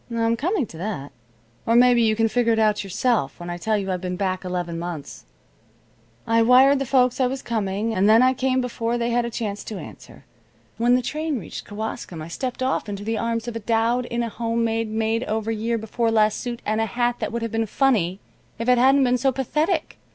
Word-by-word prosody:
"I'm 230 -1 +1
coming 320 - 0
to 165 - -12
that. 175 -8 -4 0.6
Or 230 - +3
maybe 245 0 +6
you 220 -1 +3
can 225 +1 +2
figure 235 0 +2
it - - 0
out 215 -1 +2
yourself 195 - 0
when 175 0 -6
I 175 - -5
tell 215 +4 0
you 195 -2 -2
I've 180 -1 -2
been 180 -1 -3
back 185 0 -2
eleven 175 -2 -3
months. 170 -4 -7 1.0
I 230 0 +3
wired 260 +4 +6
the 275 - -3
folks 255 -1 +2
I 255 - +4
was 265 +1 -4
coming, 215 -1 -2
and 200 +1 +3
then 225 +3 +6
I 255 0 +4
came 260 0 0
before 235 -1 -2
they 235 0 -1
had 240 0 +1
a - - -3
chance 210 -3 -4
to 215 - -6
answer. 110 - -12 0.5
When 240 +2 +4
the 250 - +1
train 305 +2 -2
reached 210 - -7
Kewaskum 205 -5 -5
I 155 +1 -7
stepped 255 +7 -4
off 260 -4 -1
into 200 0 -5
the 220 0 -2
arms 230 +1 -2
of 240 - -5
a - - -2
dowd 230 +3 +1
in 235 0 -2
a 230 - -3
home 230 +1 -1
made 225 -1 -1
made 225 +2 0
over 220 +1 -2
year 225 +1 -1
before 225 +1 -1
last 215 -1 +2
suit, 240 -2 -5
and 215 +1 0
a 225 - 0
hat 240 +2 0
that - - -3
would 235 0 -3
have 230 - -3
been 225 0 -1
funny 200 -8 +1 0.4
if 230 +1 -4
it 250 -1 +5
hadn't 270 +2 +5
been 250 -1 +2
so 270 +2 +2
pathetic. 305 - -1
230 Hz, 230 wpm, -23 LUFS, 210-245 Hz, 1.0 s, maybe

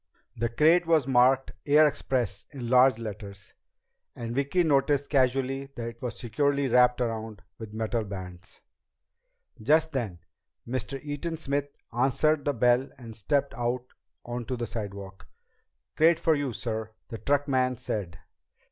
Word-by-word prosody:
The 115 +1 -1
crate 165 +8 +4
was 160 -5 +3
marked 130 +1 +4
Air 150 +2 +6
Express 120 -8 -1
in 125 -5 -6
large 130 -1 +6
letters, 100 -3 -8 0.6
and 115 -1 -5
Vicki 140 +7 +1
noticed 145 -2 +2
casually 135 0 +1
that 115 -1 -4
it 115 0 -14
was 120 -2 -4
securely 140 +4 0
wrapped 125 0 +4
around 110 -4 -3 0.2
with 110 -1 -8
metal 110 +1 -1
bands. 95 -2 -9 1.0
Just 160 +1 +3
then 115 - -3 0.5
Mr. 130 +2 -3
Eaton 150 +3 -4
Smith 145 -2 -1 0.3
answered 140 +5 +2
the 145 - +1
bell 125 +3 +3
and 115 -4 -10
stepped 140 +6 0
out 120 +1 -2 0.4
onto 120 +1 -4
the 120 - -2
sidewalk. 100 -3 -7 0.7
"Crate 165 +1 +4
for 160 - +3
you, 145 -3 -1
sir," 110 -2 -4 0.2
the 115 - -6
truckman 135 -3 +1
said. 100 -8 -4
125 Hz, 140 wpm, -27 LUFS, 115-140 Hz, 1.0 s, Air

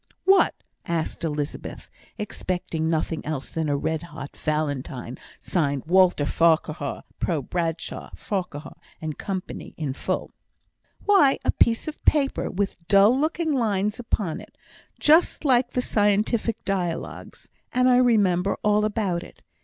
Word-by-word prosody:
"What?" 385 0 +5 0.3
asked 170 -1 -2
Elizabeth, 150 -2 -4 0.3
expecting 175 -6 -3
nothing 160 0 -1
less 150 -3 -5
than 160 -2 -1
a 145 - +1
red 160 +2 -1
hot 150 -4 -9
Valentine, 140 -5 -3 0.2
signed 145 -6 -1
Walter 180 -3 +4
Farquhar, 160 -3 +1 0.2
pro 160 -6 0
Bradshaw, 165 +2 -3
Farquhar, 180 -7 -5 0.2
and 155 -2 -5
Co., 190 -2 -2
in 150 -4 -5
full. - - -3 0.7
"Why, 370 -10 +5
a - - +4
piece 230 +4 +2
of 310 - -7
paper, 280 -3 +2
with 200 +1 -2
dull 200 +4 +6
looking 315 +2 0
lines 210 -4 0
upon 205 -8 -2
it, - - -16 0.4
just 315 +1 +4
like 250 -2 +4
the 250 - -1
scientific 215 +2 +1
dialogues; 180 -4 -3 0.2
and 250 0 +3
I 250 -1 +6
remembered 200 -7 +3
all 210 0 +3
about 200 -5 -1
it. - - -14
185 Hz, 130 wpm, -25 LUFS, 155-230 Hz, 0.7 s, dull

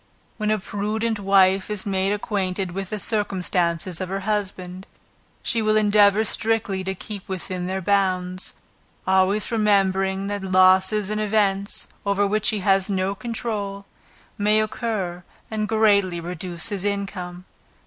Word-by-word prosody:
When 215 -1 -1
a 215 - +3
prudent 215 +3 -2
wife 195 -1 +3
is 210 -2 -2
made 195 -1 0
acquainted 195 -3 -2
with 195 0 -4
the 215 - -3
circumstances 180 -4 -1
of 185 - -3
her 195 +1 -2
husband, 190 -3 -3 0.6
she 230 - +1
will 215 0 +2
endeavor 210 0 +4
strictly 215 -4 0
to 190 0 -2
keep 200 +1 -8
within 185 -1 -4
their 190 0 -3
bounds; 185 -1 0 0.5
always 190 +3 +2
remembering 195 -3 +2
that 205 0 -3
losses 190 +2 +4
and 215 0 -1
events, 200 -2 +1 0.2
over 200 0 +1
which 210 +1 +1
he 215 -3 -1
has 195 0 +2
no 190 0 0
control, 205 -3 -4 0.5
may 210 +1 +3
occur 215 -5 -2 0.3
and 215 -1 -1
greatly 200 -5 +3
reduce 175 +1 -2
his 200 -3 -3
income. 185 -3 -4
195 Hz, 140 wpm, -23 LUFS, 185-210 Hz, 0.6 s, endeavor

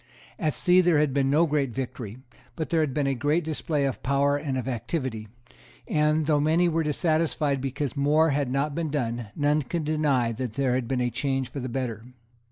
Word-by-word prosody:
At 155 -3 0
sea 180 0 +4
there 175 -3 +3
had 145 -2 +2
been 135 -1 +2
no 155 +4 +4
great 145 -4 0
victory; 120 -3 -5 0.4
but 160 - -4
there 165 - +3
had 155 -3 +1
been 145 +1 0
a 135 - +1
great 145 +6 +1
display 155 -2 -1
of 135 - -3
power 140 +1 +2
and 145 -2 -2
of 130 - -3
activity; 120 -2 -3 0.6
and, 150 0 +2
though 150 -1 +3
many 160 +4 +3
were 165 -1 +1
dissatisfied 150 -2 0
because 135 +1 -3
more 150 +3 +3
had 140 -2 0
not 140 +3 0
been 165 0 -2
done, 120 -5 -2
none 150 +1 +2
could 160 +5 -3
deny 145 -6 +1
that 120 0 -4
there 135 -1 +1
had 125 -2 -1
been 130 0 0
a 125 0 0
change 135 +1 -1
for 140 - -5
the 130 0 -4
better. 120 -3 -3
140 Hz, 205 wpm, -26 LUFS, 130-155 Hz, 0.6 s, sea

